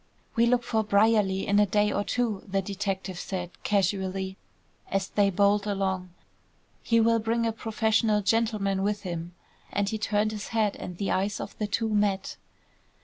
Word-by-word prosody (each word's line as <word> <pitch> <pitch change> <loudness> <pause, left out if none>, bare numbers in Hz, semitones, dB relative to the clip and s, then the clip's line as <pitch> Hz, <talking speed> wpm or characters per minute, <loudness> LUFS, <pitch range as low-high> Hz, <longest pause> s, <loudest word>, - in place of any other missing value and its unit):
"We 235 +1 +4
look 245 0 +3
for 225 -2 0
Brierly 205 -2 +3
in 200 +1 +3
a 210 - +4
day 210 +2 +2
or 205 - 0
two," 225 -3 -1
the 195 0 0
detective 190 -2 -3
said, 180 -3 -4
casually, 190 -1 0 0.5
as 195 -1 -1
they 205 -1 +3
bowled 200 +2 +2
along. 190 -2 -1 0.7
"He 230 -1 +2
will 230 0 +4
bring 230 +1 0
a 225 - +1
professional 220 -1 +1
gentleman 210 -3 +1
with 205 +1 -1
him," 170 -1 -5 0.4
and 200 0 0
he 220 - -3
turned 210 0 +1
his 210 -1 -5
head 215 -3 +1
and 180 - -7
the 200 - -1
eyes 200 +3 0
of - - -6
the 210 - 0
two 225 +2 0
met. 205 -2 0
205 Hz, 170 wpm, -27 LUFS, 195-220 Hz, 0.7 s, We